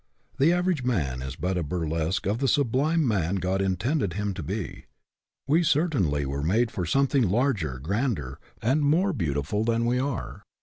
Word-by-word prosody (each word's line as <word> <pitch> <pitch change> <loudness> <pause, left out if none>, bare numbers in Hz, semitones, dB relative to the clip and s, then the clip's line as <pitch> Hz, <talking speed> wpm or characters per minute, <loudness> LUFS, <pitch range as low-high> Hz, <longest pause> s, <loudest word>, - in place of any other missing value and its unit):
The 145 +5 +5
average 180 -5 +1
man 75 - -1
is 65 +1 -5
but 90 +2 -1
a - - -1
burlesque 80 +2 -2
of 105 +4 0
the 135 - +1
sublime 145 +4 +2
man 95 -5 0
God 95 +1 0
intended 95 - 0
him 105 +1 -2
to 90 - -6
be. 75 - -5 0.6
We 155 +5 +4
certainly 135 - +1
were 70 +1 -3
made 110 +10 +1
for 90 -3 -3
some 135 +9 +3
thing 130 -7 +2
larger, 100 - 0
grander, 85 - -2 0.2
and 135 +7 +2
more 170 +7 +2
beautiful 80 - -1
than 115 +1 +1
we 125 +1 +1
are. 135 0 -3
105 Hz, 175 wpm, -26 LUFS, 85-135 Hz, 0.6 s, The